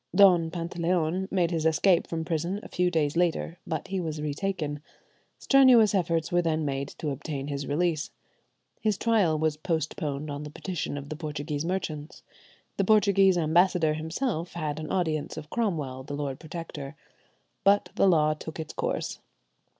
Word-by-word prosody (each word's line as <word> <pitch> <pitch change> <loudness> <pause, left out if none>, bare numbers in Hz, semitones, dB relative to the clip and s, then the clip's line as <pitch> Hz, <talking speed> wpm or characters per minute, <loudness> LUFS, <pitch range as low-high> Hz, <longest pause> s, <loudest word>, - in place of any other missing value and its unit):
Don 180 -4 +6
Pantaleon 170 +1 -1
made 180 -3 +1
his 165 -2 -1
escape 165 +3 +3
from 165 -1 -3
prison 170 +5 -1
a - - -8
few 180 0 +1
days 155 -4 0
later, 170 0 0
but 160 -2 -3
he 195 0 -1
was 160 -3 -3
retaken. 150 -1 -3 0.6
Strenuous 255 -6 +6
efforts 165 -4 0
were 175 0 +3
then 160 -2 0
made 140 -1 -2
to 150 - -2
obtain 140 0 -5
his 140 -1 -3
release. 160 +1 0 0.7
His 215 -3 +1
trial 205 -9 +2
was 155 -1 0
postponed 155 -2 -2
on 145 0 -5
the 150 - -6
petition 160 -2 -4
of 140 0 -7
the 155 - -4
Portuguese 150 -1 -4
merchants. 160 -4 -4 0.5
The 195 - +2
Portuguese 195 -2 +4
ambassador 170 0 +3
himself 165 - -3
had 155 -3 -3
an 155 - -5
audience 160 -5 -1
of 150 -1 -8
Cromwell, 155 - -1
the 145 +2 -6
Lord 140 -2 -3
Protector. 155 -3 -7 0.7
But 200 -2 +4
the 195 - +3
law 155 -4 +4
took 155 +1 -8
its 160 - -5
course. - - -2
160 Hz, 160 wpm, -27 LUFS, 150-180 Hz, 0.7 s, Don